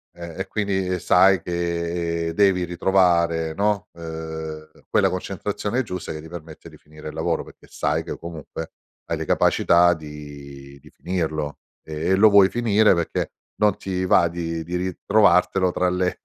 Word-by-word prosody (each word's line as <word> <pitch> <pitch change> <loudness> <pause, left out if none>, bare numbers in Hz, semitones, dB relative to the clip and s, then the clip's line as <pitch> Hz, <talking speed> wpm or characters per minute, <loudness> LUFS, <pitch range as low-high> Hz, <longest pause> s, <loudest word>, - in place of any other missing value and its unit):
Eh, 85 0 -9
e - - -3
quindi 95 -3 -1
sai 95 +2 +5
che 85 -1 -2
devi 95 -1 +3
ritrovare, 85 -2 +2
no, 100 0 0
uhm, 80 -1 -7 0.2
quella - - +3
concentrazione 100 +6 -3
giusta 90 -5 -6
che 80 - -6
ti 80 - -11
permette 80 -2 -10
di - - -14
finire 75 +1 -11
il - - -10
lavoro, 80 +1 -1
perché - - -17
sai - - -1
che - - -6
comunque 85 -3 -8 0.3
hai - - -2
le - - -4
capacità 85 0 +4
di 70 -2 -10
di - - -17
finirlo 80 -5 -3 0.2
e 80 +1 -5
e 95 - +4
lo 105 +2 +6
vuoi 100 -1 +6
finire 110 -4 +3
perché 85 -1 -2 0.3
non 105 -2 +3
ti 95 -1 -3
va 85 -1 +4
di 85 -1 -4
di 85 +2 -5
ritrovartelo 95 0 +2
tra 90 0 +1
le 90 0 -1
85 Hz, 160 wpm, -23 LUFS, 80-95 Hz, 0.3 s, lo